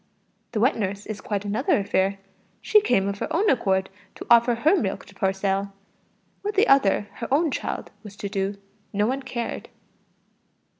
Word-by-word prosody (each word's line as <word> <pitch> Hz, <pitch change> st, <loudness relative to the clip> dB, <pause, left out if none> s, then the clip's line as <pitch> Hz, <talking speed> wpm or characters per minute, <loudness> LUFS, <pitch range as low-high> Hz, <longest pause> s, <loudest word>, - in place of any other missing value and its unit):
The 220 Hz, -, 0 dB
wet 250 Hz, +6 st, +3 dB
nurse 200 Hz, -1 st, -3 dB
is 215 Hz, -1 st, -6 dB
quite 205 Hz, -1 st, -3 dB
another 210 Hz, +7 st, +1 dB
affair; 195 Hz, -1 st, 0 dB, 0.4 s
she 425 Hz, -, +4 dB
came 220 Hz, -, +2 dB
of 200 Hz, 0 st, -3 dB
her -, -, -4 dB
own 385 Hz, +7 st, +2 dB
accord 190 Hz, -6 st, +1 dB, 0.3 s
to -, -, -8 dB
offer 235 Hz, 0 st, +6 dB
her 305 Hz, +11 st, +3 dB
milk 210 Hz, -, -2 dB
for 195 Hz, -1 st, 0 dB
sale. 195 Hz, +1 st, -1 dB, 0.7 s
What 415 Hz, +1 st, -3 dB
the 415 Hz, +4 st, +4 dB
other 270 Hz, -8 st, +4 dB, 0.2 s
her 230 Hz, -, -6 dB
own 305 Hz, +2 st, +3 dB
child -, -, -4 dB
was 210 Hz, -3 st, -11 dB
to 200 Hz, -, -5 dB
do, 195 Hz, 0 st, -2 dB, 0.4 s
no 205 Hz, +1 st, +2 dB
one 265 Hz, +4 st, -1 dB
cared. 240 Hz, -3 st, -5 dB
210 Hz, 170 wpm, -24 LUFS, 195-260 Hz, 0.7 s, offer